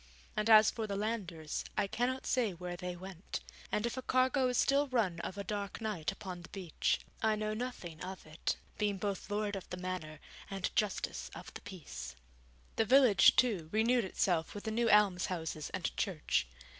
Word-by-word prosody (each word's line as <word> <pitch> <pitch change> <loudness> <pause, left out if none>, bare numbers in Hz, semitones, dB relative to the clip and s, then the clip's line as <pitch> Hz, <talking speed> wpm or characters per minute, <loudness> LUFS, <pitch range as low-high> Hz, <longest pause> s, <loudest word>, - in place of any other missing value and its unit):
And 215 +1 0
as 215 -1 +8
for 225 -2 -3
the 200 - -2
landers, 195 -7 -2
I - - +3
cannot 250 +6 -1
say 235 -7 +1
where 175 +1 -5
they 180 0 -4
went; 185 0 -6 0.3
and 210 - +1
if 235 +1 -2
a - - -2
cargo 255 +1 +3
is 250 -1 0
still 280 +1 +4
run 215 -10 +1
of 190 - -5
a 200 - -3
dark 200 -1 -3
night 205 -8 -2
upon 185 -2 -7
the 170 - -12
beach, 185 -5 -1 0.2
I 220 0 +3
know 215 0 -1
nothing 215 -9 -5
of 185 +1 -7
it, 155 +1 -2 0.2
being 205 -2 +1
both 200 0 -3
Lord 205 0 -1
of 195 - -7
the 180 - -4
Manor 180 -5 -4 0.3
and 195 -2 -3
Justice 210 -2 -1
of - - -9
the - - -8
Peace. 180 - -8 0.6
The 225 - +3
village, 250 -3 +7
too, 200 -11 +2
renewed 235 +3 +3
itself 180 -3 0
with 205 - -6
the 220 - -2
new 230 +1 +2
almshouses 180 -7 +2
and 185 - -3
church. 155 - 0
200 Hz, 185 wpm, -34 LUFS, 180-220 Hz, 0.6 s, as